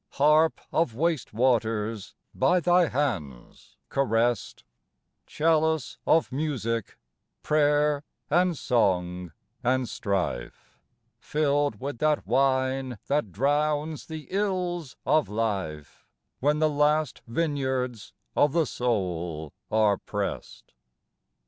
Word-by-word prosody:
Harp 155 +3 +4
of 160 -9 +1
waste 160 -1 0
waters 115 -3 0 0.2
by 180 - +3
thy 175 0 +4
hands 95 - -4
caressed, 120 -3 0 0.6
Chalice 160 0 +1
of 160 -3 +3
music 125 -6 -2 0.5
prayer 150 -1 +2 0.2
and 175 +1 +2
song 90 -8 0 0.3
and 130 0 +1
strife 95 - -3 0.4
Filled 145 -6 0
with 135 -3 -5
that 155 -1 +1
wine 130 -2 +1
that 140 -9 0
drowns 150 - 0
the 160 -2 -7
ills 180 - -1
of 155 -2 +2
life 95 -9 -3 0.3
When 145 +3 +2
the 155 0 +3
last 150 0 +1
vineyards 130 -4 -2 0.2
of 145 -1 +3
the 165 -2 +3
soul 90 - -2 0.2
are 110 -2 +3
pressed. - - -5
135 Hz, 100 wpm, -27 LUFS, 110-155 Hz, 0.6 s, Harp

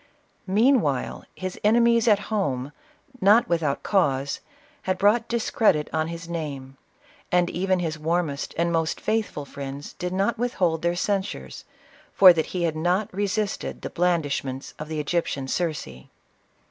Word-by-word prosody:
Meanwhile, 205 - +2
his 185 -1 -5
enemies 235 +2 +4
at 210 -2 +6 0.2
home, 140 -10 -1 0.5
not 210 +4 +5
without 160 -5 0
cause, 140 -8 +1 0.4
had 185 0 -1
brought 215 +4 +3
discredit 220 -9 +1
on 160 0 0
his 165 0 -7
name; 140 -6 -5 0.6
and 175 -1 +2
even 185 +1 +1
his 160 -3 -3
wannest 160 -2 -1
and 170 +1 +1
most 165 -1 0
faithful 215 -9 -2
friends 140 +1 -7
did 180 0 -4
not 200 +5 0
withhold 180 -10 0
their 170 0 +1
cenSures, 195 +2 -3 0.5
for 185 -2 +9
that 160 -2 -1
he 180 -2 -3
had 165 -2 0
not 180 +6 0
resisted 205 +1 -2
the - - -5
bland 175 -1 +2
ishments 135 -1 -4
of 155 - -5
the 155 -1 -3
Egyptian 145 -3 -1
Circe. 130 - -3
175 Hz, 145 wpm, -25 LUFS, 150-200 Hz, 0.6 s, for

